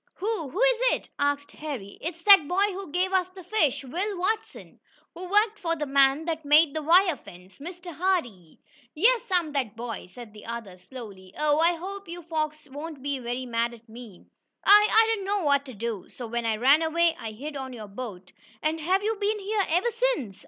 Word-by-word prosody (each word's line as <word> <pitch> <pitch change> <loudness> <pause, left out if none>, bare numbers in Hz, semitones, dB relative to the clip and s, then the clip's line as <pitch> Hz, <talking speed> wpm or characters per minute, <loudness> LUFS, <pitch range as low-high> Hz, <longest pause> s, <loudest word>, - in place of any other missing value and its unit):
"Who 395 -7 -3
who 365 - -6
is - - +3
it?" - - -5
asked 285 0 0
Harry. 265 -11 -7
"It's 335 +1 -6
that 390 -7 +8
boy 390 +4 +1
who 380 -4 -7
gave 370 +3 0
us 370 -1 +2
the 370 0 -12
fish 330 - +1
Will 370 +10 -3
Watson, 435 +5 -3 0.3
who 360 +1 -8
worked 420 +2 +2
for 335 -1 -1
the 300 -2 -3
man 275 +2 +3
that 325 -1 -3
made 295 +1 +5
the 315 - -2
wire 345 +2 +5
fence 180 -5 -15
Mr. 350 +3 -8
Hardee." 270 - -2 0.4
"Yes, 460 +8 +4
I'm 350 -5 +1
that 260 -7 -2
boy," 230 -4 -6
said 215 +3 -12
the 210 0 -13
other, 225 -6 -7
slowly. 195 -6 -11
"Oh, 300 0 +2
I 340 +2 +4
hope 390 +4 -7
your 345 +1 -8
folks 310 -2 -3
won't 290 0 -8
be 285 -1 -2
very 245 +1 -4
mad 235 0 -1
at 230 0 -21
me. 225 -4 -12 0.4
I 415 +1 +8
I 445 +1 +6
didn't 410 -4 -2
know 400 -1 0
what 280 -1 +2
to 255 - -9
do, 220 -2 -5
so 245 - -8
when 235 0 -2
I 220 - +1
ran 275 +7 +5
away, 330 +1 +2
I 220 -1 -6
hid 290 +7 -7
on 265 -1 -5
your 220 -4 -8
boat." 200 -4 -8 0.3
"And 315 +1 0
have 370 +6 +1
you 445 +1 0
been 415 +1 0
here 410 0 -1
ever 360 +9 +2
since?" 460 - -1
310 Hz, 210 wpm, -26 LUFS, 245-370 Hz, 0.4 s, that